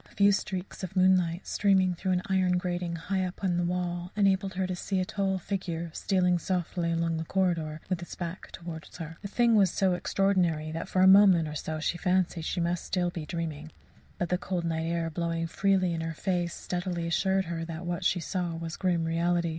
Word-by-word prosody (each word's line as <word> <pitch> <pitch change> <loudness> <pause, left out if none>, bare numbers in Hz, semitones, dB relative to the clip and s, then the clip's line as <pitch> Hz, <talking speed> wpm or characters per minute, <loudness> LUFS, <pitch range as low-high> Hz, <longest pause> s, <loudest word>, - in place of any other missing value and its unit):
A - - -21
few 200 0 +5
streaks 195 -1 -3
of 185 +1 -5
moonlight, 185 -2 +3
streaming 190 -3 +3
through 185 +2 -1
an 180 0 0
iron 185 -1 +2
grating 175 -1 -2
high 190 +3 -1
up 185 +1 -5
in 180 -2 +1
the 175 - +1
wall, 175 0 -2
enabled 195 -2 +2
her 190 0 0
to 185 0 -2
see 190 +2 -2
a 185 - 0
tall 195 0 -1
figure 170 -3 -4
stealing 180 -2 +2
softly 175 -1 -1
along 165 0 0
the 160 - -2
corridor, 165 -4 0
with 180 -2 -2
its 175 - -8
back 175 +1 -6
towards 170 0 -8
her. 165 -1 -7
The - - -5
thing 235 +3 +3
was 200 -4 +5
so 190 +1 +1
extraordinary 175 -4 +1
that 165 +1 -4
for 185 - +2
a - - +7
moment 190 -4 +7
or 150 - -5
so 155 +1 -4
she 170 +2 -1
fancied 180 -3 +1
she 180 - -2
must 170 0 0
still 175 -1 0
be 160 -3 -6
dreaming; 160 -2 -4 0.5
but 175 - -2
the 180 - +1
cold 180 -1 -2
night 160 -1 -1
air 165 -1 -1
blowing 165 0 -1
freely 185 +1 +1
in 165 - -2
her 165 0 -4
face 175 -1 -1
speedily 175 -1 -3
assured 190 +3 +1
her 165 -1 -3
that 165 +1 -6
what 175 +1 -2
she 175 - +2
saw 175 0 -2
was 165 0 -5
grim 175 -3 +1
reality. 170 +1 +1
175 Hz, 215 wpm, -29 LUFS, 165-185 Hz, 0.5 s, a